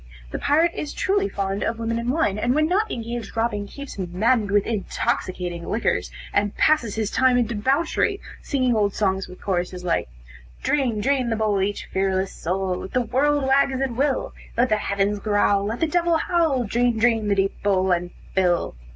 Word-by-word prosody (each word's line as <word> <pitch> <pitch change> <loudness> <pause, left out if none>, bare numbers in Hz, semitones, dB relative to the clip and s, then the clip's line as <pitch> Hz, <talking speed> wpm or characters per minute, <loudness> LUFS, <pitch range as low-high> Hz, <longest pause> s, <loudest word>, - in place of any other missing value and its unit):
The - - -4
pirate 320 +4 +3
is 295 - -5
truly 400 +1 +1
fond 195 0 -2
of 225 - -1
women 230 0 -2
and 235 +1 -2
wine, 255 -8 +1
and 245 +4 +1
when 310 0 +3
not 410 +5 +1
engaged 235 -2 -4
in - - -14
robbing, 225 -3 -1
keeps 280 -2 -9
maddened 205 +5 +1
with 205 0 +2
intoxicating 180 -4 -2
liquors, 225 - 0 0.2
and 205 0 0
passes 275 -9 +2
his 220 -1 -1
time 260 -1 +3
in 245 - +3
debauchery, 275 - 0 0.2
singing 255 -4 +1
old 205 -2 +1
songs 190 -2 0
with 180 - -12
chorusses 180 -1 -2
like 170 - 0 0.5
"Drain, 250 -7 +1
drain 260 0 +1
the 225 - +1
bowl, 215 -3 +1
each 200 +1 -2
fearless 190 0 0
soul, 185 +1 -2
Let 190 - -8
the 255 - +2
world 285 +5 +1
wag 270 +1 +4
as 260 -1 -3
it 270 -2 0
will: 270 +3 0 0.2
Let 250 +2 +3
the 215 - +3
heavens 200 0 0
growl, 205 -1 +2
let 225 +3 -3
the 325 - +3
devil 340 +1 +2
howl, 320 -7 +1
Drain, 240 +2 +1
drain 225 -2 +2
the 200 - +2
deep 195 0 -1
bowl 190 -2 +2
and 175 0 0 0.2
fill." 180 -2 +1
225 Hz, 195 wpm, -23 LUFS, 195-265 Hz, 0.5 s, wag